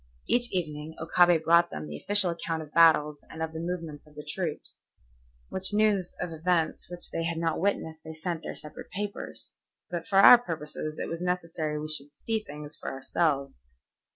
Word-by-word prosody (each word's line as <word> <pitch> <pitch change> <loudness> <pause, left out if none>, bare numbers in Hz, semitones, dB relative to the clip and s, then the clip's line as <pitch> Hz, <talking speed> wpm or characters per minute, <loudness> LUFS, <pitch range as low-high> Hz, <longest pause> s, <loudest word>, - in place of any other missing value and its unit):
Each 240 0 +2
evening 155 -3 -3
Okabe 175 +1 +4
brought 170 +1 +5
them 75 - -6
the 75 0 -7
official 200 - +3
account 165 -1 -3
of 150 - -15
battles 150 -3 +5
and 160 0 -5
of 160 0 -4
the 160 - -5
movements 165 -4 -5
of 150 - -19
the 150 - -8
troops, 160 -1 -4 0.7
which 190 +2 -3
news 210 -4 +2
of 175 -1 -3
events 165 0 0
which 175 0 -6
they 165 - -2
had 165 0 -1
not 165 0 0
witnessed 160 -4 -1
they 160 0 -8
sent 165 +1 -3
to - - -8
their - - -5
separate 150 - -10
papers. 205 +1 -5 0.4
But 170 -2 -4
for 195 - +1
our 235 +5 +10
purposes 155 -6 -5
it - - -3
was 165 +1 -5
necessary 170 -4 -2
we 155 - -4
should 145 -1 -4
see 225 +6 -1
things 150 -1 -9
for - - -6
ourselves. 140 - -1
165 Hz, 190 wpm, -28 LUFS, 150-180 Hz, 0.7 s, our